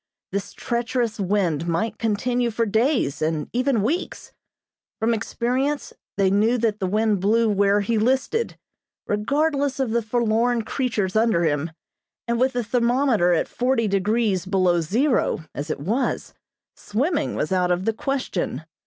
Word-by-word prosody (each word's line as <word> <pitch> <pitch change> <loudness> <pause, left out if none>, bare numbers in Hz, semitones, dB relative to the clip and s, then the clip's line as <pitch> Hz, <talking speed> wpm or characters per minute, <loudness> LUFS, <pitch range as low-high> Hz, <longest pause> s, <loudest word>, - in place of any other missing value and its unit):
This 200 +1 -4
treacherous 235 -2 -2
wind 180 -5 0
might 210 +7 -1
continue 240 +2 0
for 230 +1 0
days 225 - +1
and 155 -1 -1
even 250 -3 +1
weeks. 305 +11 -3 0.7
From 225 +1 +2
experience 255 +6 -1 0.2
they 195 -1 +3
knew 220 +5 +3
that 220 -3 0
the 190 - -1
wind 210 +1 +1
blew 225 +4 +3
where 200 0 +3
he 220 +2 0
listed, 265 - 0 0.5
regardless 280 +6 0
of 260 -4 0
the 235 +1 +1
forlorn 230 +1 +1
creatures 220 -7 -2
under 220 -6 +3
him, 150 0 0 0.6
and 235 0 0
with 260 +1 +2
the 245 0 -1
thermometer 235 -4 +2
at 165 - +1
forty 245 -2 0
degrees 200 -1 0
below 185 -3 +2
zero, 235 - +1
as 145 - -5
it - - -2
was, 220 - -2 0.4
swimming 290 - -1
was 155 - -2
out 180 -1 +2
of 180 +1 0
the 225 - +1
question. 220 - -3
220 Hz, 145 wpm, -23 LUFS, 195-245 Hz, 0.7 s, they